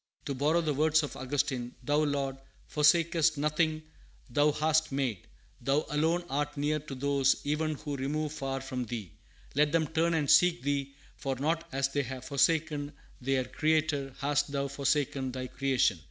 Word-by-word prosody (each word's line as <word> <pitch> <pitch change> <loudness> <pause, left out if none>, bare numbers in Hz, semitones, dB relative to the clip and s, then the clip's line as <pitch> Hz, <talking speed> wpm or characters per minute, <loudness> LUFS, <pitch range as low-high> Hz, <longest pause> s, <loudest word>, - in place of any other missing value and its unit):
To 140 - -2
borrow 150 +6 +2
the 155 -3 0
words 155 +2 +3
of 145 - -5
Augustine 130 -2 -2
"Thou, 145 +3 +1
Lord, 140 -3 0 0.3
forsakest 160 +1 +3
nothing 155 +1 0 0.5
thou 145 +4 +4
hast 155 +1 +1
made. 130 -8 -2 0.3
Thou 140 +2 +1
alone 160 +4 +1
art 145 +1 -2
near 150 +2 +1
to 145 -2 -8
those 140 0 +2
even 155 +1 0
who 145 0 -5
remove 150 +3 -2
far 135 -2 -3
from 130 -2 -4
thee. 110 -7 -5 0.4
Let 150 +1 +3
them 165 0 +2
turn 165 +2 +1
and 150 -3 0
seek 175 0 +5
thee, 140 -1 -1 0.2
for 135 -2 -2
not 160 +5 -1
as 135 -1 0
they 145 +1 0
have 130 -1 -6
forsaken 150 +1 +1 0.3
their 130 0 +1
Creator 150 -2 0
hast 145 0 0
thou 140 -1 -1
forsaken 140 -1 0
thy 130 0 -4
creation." 130 -8 +1
145 Hz, 165 wpm, -30 LUFS, 135-155 Hz, 0.5 s, seek